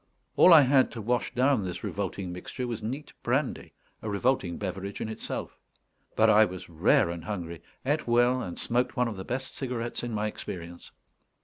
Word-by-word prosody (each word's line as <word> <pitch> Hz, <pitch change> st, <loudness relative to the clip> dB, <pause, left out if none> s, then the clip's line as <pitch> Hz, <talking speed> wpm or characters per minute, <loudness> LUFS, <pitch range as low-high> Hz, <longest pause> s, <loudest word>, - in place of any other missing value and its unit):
All 185 Hz, -, +7 dB
I 160 Hz, -3 st, +10 dB
had 135 Hz, -1 st, +4 dB
to 115 Hz, -, -6 dB
wash 115 Hz, -2 st, 0 dB
down 130 Hz, -3 st, +3 dB
this 90 Hz, -1 st, -5 dB
revolting 95 Hz, -2 st, -3 dB
mixture 90 Hz, +8 st, -5 dB
was 120 Hz, -3 st, -4 dB
neat 130 Hz, +7 st, -5 dB
brandy: -, -, -1 dB, 0.3 s
a 110 Hz, -, -4 dB
revolting 100 Hz, -4 st, 0 dB
beverage 100 Hz, 0 st, -5 dB
in -, -, -3 dB
itself. 110 Hz, -, -5 dB, 0.6 s
But -, -, +5 dB
I 110 Hz, +1 st, +7 dB
was 95 Hz, -4 st, -4 dB
rare 85 Hz, +1 st, +3 dB
and 85 Hz, -1 st, -6 dB
hungry; 85 Hz, -4 st, -5 dB, 0.2 s
ate 145 Hz, +1 st, 0 dB
well, 120 Hz, +2 st, +3 dB
and 90 Hz, -6 st, -6 dB
smoked 125 Hz, +2 st, -1 dB
one 125 Hz, 0 st, +2 dB
of 115 Hz, -, -4 dB
the 95 Hz, -, -6 dB
best 130 Hz, +5 st, -4 dB
cigarettes 120 Hz, -3 st, -3 dB
in 120 Hz, -, -4 dB
my 105 Hz, -1 st, -1 dB
experience. 85 Hz, -5 st, -7 dB
110 Hz, 185 wpm, -28 LUFS, 95-125 Hz, 0.6 s, I